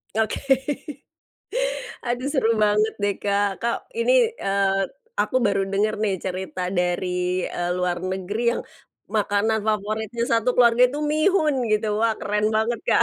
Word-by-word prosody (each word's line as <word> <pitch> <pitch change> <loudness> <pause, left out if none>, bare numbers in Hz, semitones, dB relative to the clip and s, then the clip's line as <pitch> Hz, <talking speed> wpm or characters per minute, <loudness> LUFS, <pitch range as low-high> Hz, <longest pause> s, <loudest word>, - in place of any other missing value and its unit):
Oke. 220 0 0 1.7
Aduh 245 +3 -1
seru 260 -6 +2
banget 210 +1 +2
deh, 205 -1 +1
Kak. 205 0 +2
Kak, 235 0 +1 0.2
ini - - +3 0.3
eee, 195 0 +2 0.5
aku - - 0
baru 195 -1 +1
denger 210 +2 +1
nih, 205 -3 +1
cerita 185 -1 -4 0.2
dari 180 +1 0 0.4
eee, 175 0 -3
luar 180 -1 0
negeri, 190 +4 -3
yang - - -3 0.5
makanan 215 +1 +1
favoritnya 215 +2 -1
satu 230 +2 +2
keluarga 240 0 +5
itu 290 - -4
mihun, 310 -2 +3 0.2
gitu. 215 +1 +1
Wah! 230 0 +3
keren 210 +1 0
banget, 225 +1 0
Kak. - - +5
215 Hz, 140 wpm, -23 LUFS, 195-235 Hz, 1.7 s, keluarga